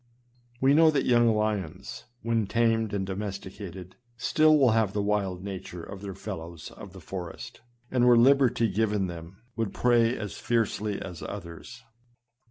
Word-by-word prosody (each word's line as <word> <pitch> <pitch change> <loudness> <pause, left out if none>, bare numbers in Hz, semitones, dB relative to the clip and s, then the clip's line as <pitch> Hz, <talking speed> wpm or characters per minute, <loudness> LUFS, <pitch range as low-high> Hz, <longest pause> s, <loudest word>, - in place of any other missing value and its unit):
We 135 +2 +4
know 160 +1 +6
that 145 -3 +1
young 120 -1 +4
lions, 105 -6 -3 0.2
when 115 -2 0
tamed 115 0 +1
and 100 -2 -2
domesticated, 95 -2 -7 0.2
stUl 155 +5 +4
will 130 -5 +5
have 110 -3 +1
the 105 - 0
wild 100 -3 -1
nature 95 -3 -7
of 95 +2 -9
their 100 -2 -6
fellows 85 -5 -7
of 100 -3 -11
the 95 - -10
forest, 90 +3 -8 0.3
and 125 -1 +3
were 120 -1 +7
liberty 125 -2 +4
given 105 -1 0
them, 85 +4 -9
would 115 -3 -3
prey 120 -1 +3
as 105 -2 -5
fiercely 110 -3 -1
as 90 -4 -8
others. 105 +6 -8
105 Hz, 155 wpm, -27 LUFS, 95-115 Hz, 0.3 s, were